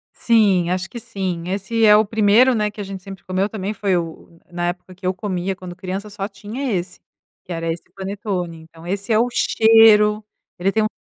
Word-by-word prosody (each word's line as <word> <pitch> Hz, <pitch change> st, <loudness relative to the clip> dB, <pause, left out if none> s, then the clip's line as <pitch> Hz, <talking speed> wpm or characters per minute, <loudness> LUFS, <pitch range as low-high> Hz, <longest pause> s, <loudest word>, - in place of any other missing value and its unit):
Sim. 200 Hz, -7 st, +3 dB
Acho 185 Hz, +1 st, -2 dB
que 240 Hz, -, -7 dB
sim. 185 Hz, -5 st, -4 dB
Esse 205 Hz, +4 st, 0 dB
é 210 Hz, -, +8 dB
o 215 Hz, 0 st, +4 dB
primeiro 220 Hz, +4 st, +4 dB
né, 210 Hz, -1 st, +1 dB
que 210 Hz, 0 st, -8 dB
a -, -, -3 dB
gente 195 Hz, -1 st, -7 dB
sempre 195 Hz, 0 st, -10 dB
comeu, 185 Hz, +2 st, -1 dB
também 210 Hz, -1 st, -4 dB
foi 195 Hz, -2 st, 0 dB
o 170 Hz, -1 st, -2 dB, 0.2 s
o 165 Hz, -, -22 dB
na 175 Hz, 0 st, -1 dB
época 180 Hz, +1 st, -8 dB
que 185 Hz, -, -12 dB
eu 185 Hz, -, +1 dB
comia 185 Hz, -1 st, -3 dB
quando 180 Hz, -1 st, -9 dB
criança 190 Hz, +3 st, -5 dB
só 200 Hz, -1 st, -4 dB
tinha 215 Hz, +6 st, -5 dB
esse. 180 Hz, 0 st, -4 dB, 0.5 s
Que 180 Hz, -, -6 dB
era 165 Hz, 0 st, -2 dB
esse 165 Hz, -, -6 dB
panetone. 190 Hz, -3 st, -4 dB
Então 160 Hz, +1 st, -16 dB
esse 200 Hz, +4 st, -3 dB
é 215 Hz, -, +4 dB
o 240 Hz, -, +3 dB
cheiro, 220 Hz, -2 st, +5 dB, 0.3 s
ele 190 Hz, +3 st, +1 dB
tem 220 Hz, +1 st, +1 dB
um 215 Hz, -, +2 dB
195 Hz, 220 wpm, -20 LUFS, 180-210 Hz, 0.5 s, é